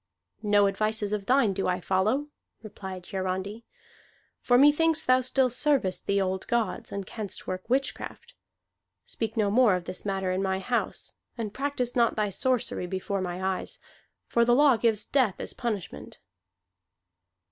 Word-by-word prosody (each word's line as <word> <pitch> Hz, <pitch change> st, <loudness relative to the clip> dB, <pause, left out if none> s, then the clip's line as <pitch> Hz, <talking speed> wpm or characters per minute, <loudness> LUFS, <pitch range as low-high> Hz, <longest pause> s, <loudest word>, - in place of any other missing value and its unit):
"No 205 Hz, -1 st, +4 dB
advices 215 Hz, +1 st, -1 dB
of 205 Hz, -2 st, -3 dB
thine 250 Hz, -6 st, +4 dB
do 195 Hz, -, -1 dB
I 180 Hz, 0 st, 0 dB
follow," 215 Hz, +11 st, 0 dB, 0.3 s
replied 190 Hz, -4 st, -8 dB
Hiarandi. 190 Hz, +3 st, -4 dB, 0.7 s
"For 245 Hz, -, +3 dB
methinks 300 Hz, +3 st, +4 dB
thou 255 Hz, 0 st, +4 dB
still 255 Hz, 0 st, +2 dB
servest 260 Hz, -8 st, +1 dB
the 200 Hz, 0 st, +2 dB
old 190 Hz, -1 st, -2 dB
gods, 235 Hz, -6 st, -1 dB
and 200 Hz, -1 st, -4 dB
canst 210 Hz, -1 st, -7 dB
work 185 Hz, +3 st, -5 dB
witchcraft. 275 Hz, -, -2 dB, 0.7 s
Speak 225 Hz, 0 st, -4 dB
no 205 Hz, -2 st, +2 dB
more 230 Hz, -3 st, +5 dB
of 180 Hz, -, -3 dB
this 185 Hz, -, -6 dB
matter 195 Hz, -2 st, -1 dB
in 185 Hz, +1 st, 0 dB
my 190 Hz, -1 st, 0 dB
house; 240 Hz, +6 st, -2 dB, 0.2 s
and 215 Hz, -3 st, -4 dB
practise 265 Hz, -3 st, -2 dB
not 235 Hz, -2 st, +3 dB
thy 210 Hz, -2 st, 0 dB
sorcery 245 Hz, -5 st, -1 dB
before 190 Hz, +2 st, -2 dB
my 185 Hz, +1 st, -2 dB
eyes, -, -, -4 dB, 0.5 s
for 235 Hz, -, +2 dB
the 240 Hz, +1 st, +4 dB
law 285 Hz, -1 st, +6 dB
gives 220 Hz, -2 st, +1 dB
death 255 Hz, -9 st, +2 dB
as -, -, -4 dB
punishment." 200 Hz, -, -5 dB
215 Hz, 155 wpm, -27 LUFS, 190-250 Hz, 0.7 s, law